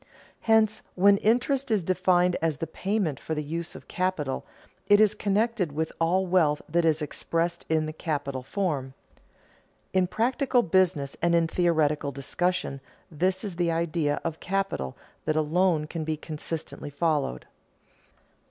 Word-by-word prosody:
Hence, 220 Hz, -1 st, +3 dB
when 200 Hz, +2 st, +5 dB
interest 250 Hz, +6 st, +1 dB
is 215 Hz, -5 st, +2 dB
defined 180 Hz, 0 st, +2 dB
as 160 Hz, -3 st, 0 dB
the 165 Hz, -, -3 dB
payment 180 Hz, -2 st, -2 dB
for 160 Hz, -, -4 dB
the 150 Hz, -, -2 dB
use 165 Hz, +3 st, -5 dB
of -, -, -11 dB
capital, 180 Hz, -7 st, -2 dB, 0.4 s
it 205 Hz, 0 st, +6 dB
is 215 Hz, -1 st, +5 dB
connected 210 Hz, -4 st, 0 dB
with 160 Hz, +2 st, -2 dB
all 180 Hz, +3 st, +2 dB
wealth 165 Hz, -5 st, +3 dB
that 170 Hz, +2 st, +1 dB
is 160 Hz, -1 st, +2 dB
expressed 170 Hz, +3 st, -2 dB
in 160 Hz, -1 st, +2 dB
the 155 Hz, -, -5 dB
capital 145 Hz, -4 st, -3 dB
form. 135 Hz, -4 st, -2 dB, 1.0 s
In 185 Hz, -1 st, +3 dB
practical 245 Hz, +4 st, +1 dB
business 170 Hz, -6 st, +1 dB
and 170 Hz, 0 st, +3 dB
in 165 Hz, -1 st, +4 dB
theoretical 155 Hz, -4 st, +1 dB
discussion 140 Hz, +2 st, -1 dB, 0.3 s
this 185 Hz, +4 st, 0 dB
is 195 Hz, -5 st, -5 dB
the 175 Hz, -1 st, +1 dB
idea 165 Hz, -3 st, 0 dB
of 160 Hz, -1 st, -3 dB
capital 195 Hz, -, -2 dB, 0.3 s
that 155 Hz, -, +1 dB
alone 155 Hz, +1 st, +2 dB
can 160 Hz, +1 st, -5 dB
be 155 Hz, 0 st, -2 dB
consistently 155 Hz, -1 st, -6 dB
followed. 145 Hz, -, -1 dB
170 Hz, 145 wpm, -27 LUFS, 155-190 Hz, 1.0 s, it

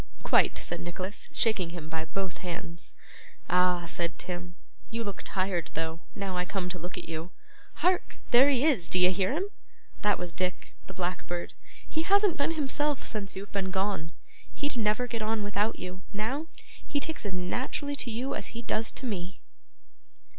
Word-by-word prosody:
'Quite,' -, -, +5 dB
said -, -, -2 dB
Nicholas, 185 Hz, +3 st, -4 dB
shaking 200 Hz, -7 st, +2 dB
him 170 Hz, -2 st, -6 dB
by 160 Hz, 0 st, -2 dB
both 190 Hz, +2 st, -2 dB
hands. 170 Hz, -1 st, -4 dB, 0.6 s
'Ah!' 180 Hz, -1 st, +4 dB
said 170 Hz, 0 st, -1 dB
Tim, 175 Hz, -1 st, -5 dB, 0.3 s
'you 230 Hz, +1 st, -1 dB
look 200 Hz, -3 st, -4 dB
tired 185 Hz, -3 st, 0 dB
though, 160 Hz, +1 st, -1 dB, 0.2 s
now 195 Hz, -2 st, -2 dB
I 180 Hz, -, +2 dB
come 180 Hz, -1 st, -2 dB
to 180 Hz, 0 st, -3 dB
look 175 Hz, +3 st, -5 dB
at -, -, -5 dB
you. 165 Hz, +1 st, -3 dB, 0.6 s
Hark! 365 Hz, 0 st, +3 dB
there 260 Hz, +3 st, +9 dB
he 270 Hz, 0 st, +4 dB
is, 245 Hz, -, +4 dB
d'ye 180 Hz, 0 st, +6 dB
hear 190 Hz, 0 st, +2 dB
him? 380 Hz, +7 st, 0 dB, 0.5 s
That 210 Hz, 0 st, +4 dB
was 175 Hz, -1 st, -4 dB
Dick, 185 Hz, -1 st, -1 dB
the -, -, -7 dB
blackbird. 175 Hz, -1 st, -2 dB, 0.3 s
He 315 Hz, -, 0 dB
hasn't 400 Hz, +1 st, +5 dB
been 305 Hz, +4 st, +2 dB
himself 295 Hz, -1 st, +1 dB
since 205 Hz, -3 st, -3 dB
you've 195 Hz, +1 st, -6 dB
been 195 Hz, -2 st, 0 dB
gone. 190 Hz, -4 st, 0 dB, 0.4 s
He'd 290 Hz, -1 st, -2 dB
never 215 Hz, +1 st, +2 dB
get 230 Hz, -2 st, -3 dB
on 215 Hz, 0 st, +1 dB
without 205 Hz, +2 st, +1 dB
you, 185 Hz, +1 st, -6 dB
now; 255 Hz, +10 st, -1 dB, 0.4 s
he 290 Hz, -, 0 dB
takes 320 Hz, +2 st, -3 dB
as 200 Hz, -3 st, -2 dB
naturally 255 Hz, +10 st, -1 dB
to 245 Hz, -, +1 dB
you 245 Hz, +4 st, -1 dB
as -, -, -4 dB
he 235 Hz, -, -4 dB
does 225 Hz, 0 st, +1 dB
to 270 Hz, -, -5 dB
me. 190 Hz, -5 st, -3 dB
195 Hz, 175 wpm, -30 LUFS, 180-240 Hz, 0.6 s, there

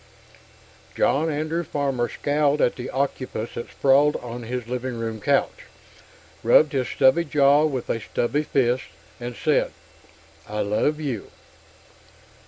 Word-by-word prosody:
| -, -, -26 dB
+ -, -, -27 dB
+ -, -, -27 dB
John 155 Hz, +4 st, +2 dB
Andrew 155 Hz, +3 st, -2 dB
Farmer 135 Hz, -5 st, -1 dB
scowled 145 Hz, 0 st, +1 dB
at 120 Hz, -, +2 dB
the 125 Hz, -, -6 dB
octopus 130 Hz, -4 st, -2 dB
that 120 Hz, -, -6 dB
sprawled 140 Hz, +2 st, +3 dB
on 120 Hz, 0 st, -6 dB
his 120 Hz, 0 st, -5 dB
living 125 Hz, 0 st, -3 dB
room 115 Hz, -1 st, -4 dB
couch, -, -, 0 dB, 0.8 s
rubbed 145 Hz, +6 st, +5 dB
his 130 Hz, -3 st, 0 dB
stubbly 165 Hz, +6 st, +3 dB
jaw 145 Hz, -1 st, +4 dB
with 135 Hz, -5 st, -2 dB
a 115 Hz, -, -1 dB
stubby 120 Hz, +7 st, -1 dB
fist, 130 Hz, -4 st, 0 dB, 0.3 s
and 120 Hz, 0 st, -6 dB
said, 150 Hz, +3 st, +1 dB, 0.8 s
"I 105 Hz, 0 st, -2 dB
love 110 Hz, +9 st, 0 dB
you." 135 Hz, -9 st, -4 dB
135 Hz, 145 wpm, -24 LUFS, 120-145 Hz, 0.8 s, rubbed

